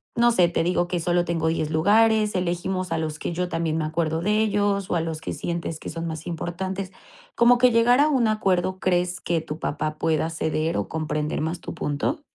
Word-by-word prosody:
no 240 0 +4
sé, 180 -7 +4
te 170 - 0
digo 175 0 +1
que 175 0 -2
solo 175 +1 +1
tengo 165 -1 -1
10 160 -1 0
lugares. 210 +5 +3
Elegimos 185 0 -2
a 165 - 0
los 155 -1 -3
que - - -3
yo 180 +1 -1
también 165 -2 -1
me 160 - -1
acuerdo 160 0 -1
de 210 +4 +1
ellos, 205 -2 0
o - - +1
a 170 - +1
los 160 -1 -4
que - - -4
sientes 170 -2 -4
que - - -7
son 165 +1 -4
más 160 -1 -6
importantes. 185 +3 -4 0.4
Como 240 +1 +5
que 250 0 +5
llegar 235 +2 +4
a 300 - +4
un 260 -6 +2
acuerdo. 190 -3 0
¿Crees 180 0 0
que 170 -1 0
tu 155 0 -7
papá 155 0 -3
pueda 160 0 0
ceder 160 0 -1
o - - -2
comprender 150 -1 -2
más 160 +3 -3
tu - - -6
punto? 150 - -2
175 Hz, 220 wpm, -24 LUFS, 160-195 Hz, 0.4 s, Como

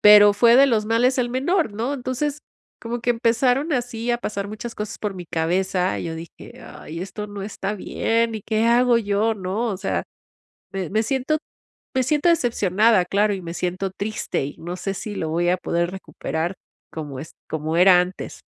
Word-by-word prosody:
Pero 210 0 +9
fue 235 +4 +5
de 275 - +8
los 215 -4 +1
males 245 +4 +2
el 240 -1 +1
menor, 275 - +1
¿no? 235 +6 -1
Entonces, 280 +2 -2 0.4
como 235 +1 -4
que 240 - +1
empezaron 245 +5 +2
así 240 -1 -2
a 240 - +2
pasar 200 -3 -4
muchas 225 +2 -6
cosas 210 +1 -5
por 210 -2 -2
mi 180 -1 -8
cabeza, 180 +3 0
y - - -4
yo 165 -1 -4
dije: 165 0 -10
"Ay, 165 +2 -9
esto 210 +2 -6
no 205 -1 -7
está 200 0 -4
bien. 230 +3 0
¿Y 215 - -4
qué 220 0 0
hago 240 +1 +4
yo?", 215 +1 +1
¿no? 200 +4 -2
O 205 - -1
sea, 190 +1 -2 0.7
me 190 -3 -3
me 215 +2 +2
siento 270 +5 0 0.6
me 260 - +3
siento 295 +5 +1
decepcionada, 215 - +3
claro, 205 +2 +2
y 190 - -4
me 170 0 -6
siento 185 +2 -2
triste, 205 -6 -3
y 145 - -8
no 175 +2 -5
sé 195 +2 -3
si 205 +1 -6
lo 160 - -2
voy 170 +2 0
a 180 - +2
poder 175 0 -1
recuperar 175 -2 -4 0.4
como 145 -4 -6
es 155 - -8 0.2
como 160 +1 -2
era 180 0 +7
antes. 180 +1 -6
210 Hz, 195 wpm, -23 LUFS, 185-240 Hz, 0.7 s, Pero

